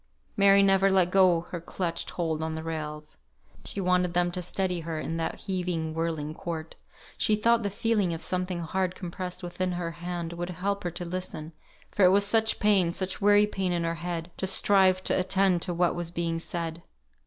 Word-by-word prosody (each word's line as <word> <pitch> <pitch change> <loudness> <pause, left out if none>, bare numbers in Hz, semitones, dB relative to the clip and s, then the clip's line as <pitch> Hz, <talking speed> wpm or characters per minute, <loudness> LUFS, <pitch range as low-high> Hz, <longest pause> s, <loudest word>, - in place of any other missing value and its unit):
Mary 200 -1 +6
never 195 0 +4
let 185 -2 +3
go 185 -3 +5
her 175 - -4
clutched 170 0 -3
hold 160 -3 -2
on 160 0 -2
the 160 - -5
rails. 150 - -6 0.5
She - - -4
wanted 180 -1 +1
them 175 0 +2
to 180 0 -3
steady 180 0 -1
her, 165 -1 -4
in 165 +1 -3
that 165 - -3
heaving, 180 -5 -2
whirling 160 -2 -2
court. 160 -1 -6 0.4
She 215 - +3
thought 230 +2 +3
the 205 - -1
feeling 205 -2 0
of 165 0 -3
something 180 -1 -1
hard 185 +2 -1
compressed 180 0 -6
within 180 +1 -2
her 175 -1 -3
hand 170 0 -5
would 175 +1 -4
help 195 +3 -2
her - - +1
to 175 - -3
listen, 170 -3 -5 0.4
for 205 - +1
it 180 - +8
was 200 +2 +4
such 220 +1 +2
pain, 195 -5 +3
such 185 +3 -3
weary 205 +1 +6
pain 195 -3 -2
in 170 -1 0
her 165 0 0
head, 170 -1 -4
to 190 - -2
strive 190 -1 +3
to - - +1
attend 190 -1 +2
to 180 - -1
what 175 0 +2
was 175 -1 -3
being 170 -1 -2
said. 165 -1 -4
180 Hz, 200 wpm, -27 LUFS, 165-190 Hz, 0.5 s, it